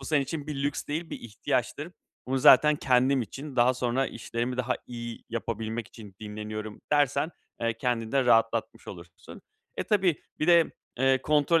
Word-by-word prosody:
Bu 135 - -9
senin 145 -2 +2
için 145 +2 -5
bir 140 -2 -4
lüks 145 - -2
değil, 160 +3 -4
bir - - -6
ihtiyaçtır. 110 -3 -3 0.3
"Bunu 135 +1 0
zaten 150 +2 +7
kendim 130 0 +3
için, 135 +5 -8
daha 125 +2 +4
sonra 125 +2 0
işlerimi 120 +2 -4
daha 125 0 0
iyi 120 -1 -7
yapabilmek 115 0 -4
için 105 -4 -13
dinleniyorum," 110 0 -6
dersen, 145 +2 +2 0.3
eee, 115 -1 0
kendini 115 -3 -1
de 135 -2 +3
rahatlatmış 115 -1 +1
olursun. 85 -1 -11 0.4
Eee, - - -1
tabii 190 -6 +2 0.2
bir 155 - 0
de, 170 -2 +5 0.3
eee, 135 0 +3
kontrol 150 +2 +3
125 Hz, 165 wpm, -27 LUFS, 115-145 Hz, 0.4 s, zaten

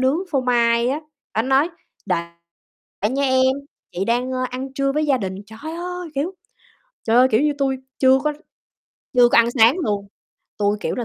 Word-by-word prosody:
nướng 260 +4 +2
phô 275 - +1
mai 235 -1 +2
á, 280 +4 -1 0.3
bả 220 - +2
nói: 270 +6 +2 0.4
"Đợi 170 - 0 0.9
nha 275 +2 -1
em, 260 0 +3 0.4
chị 185 - -2
đang, 245 +4 0
ơ, 255 0 -1
ăn 260 +1 -5
trưa 275 0 0
với 305 +1 0
gia 275 - +3
đình." 190 -4 -4
Trời 220 +2 -13 0.2
ơi, 360 0 -5
kiểu, 315 +8 -2 0.7
trời 230 +1 +2
ơi, 255 - +7
kiểu 220 - +3
như, 295 0 +2
tui 270 -2 0 0.2
chưa 265 0 +5
có 300 - 0 0.8
chưa 245 -1 +6
có - - +4
ăn 235 0 +5
sáng 235 +1 +5
luôn, 205 - -2 0.5
tui, 205 0 +1
kiểu - - -2
là, 245 - -3
260 Hz, 190 wpm, -21 LUFS, 235-275 Hz, 0.9 s, ơi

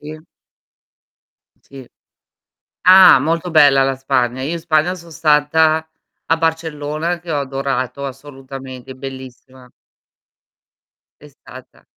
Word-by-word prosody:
Sì. 155 +1 -9 1.4
Sì. 135 -2 -13 1.0
Ah, 185 -4 +7
molto 165 +5 -2
bella 145 -4 +5
la 135 0 -1
Spagna. 130 -2 -1
Io 145 +6 -3
in 170 - -4
Spagna 165 +2 0
son 170 -1 -14
stata 155 +1 +1 0.4
a 165 - +1
Barcellona, 160 0 -3
che 170 -1 -8
ho 145 - -1
adorato 135 0 -4
assolutamente, 135 -1 -10
bellissima. 130 -1 -11 1.5
È 150 - -15
stata 130 -2 -16
145 Hz, 105 wpm, -17 LUFS, 135-160 Hz, 1.5 s, Ah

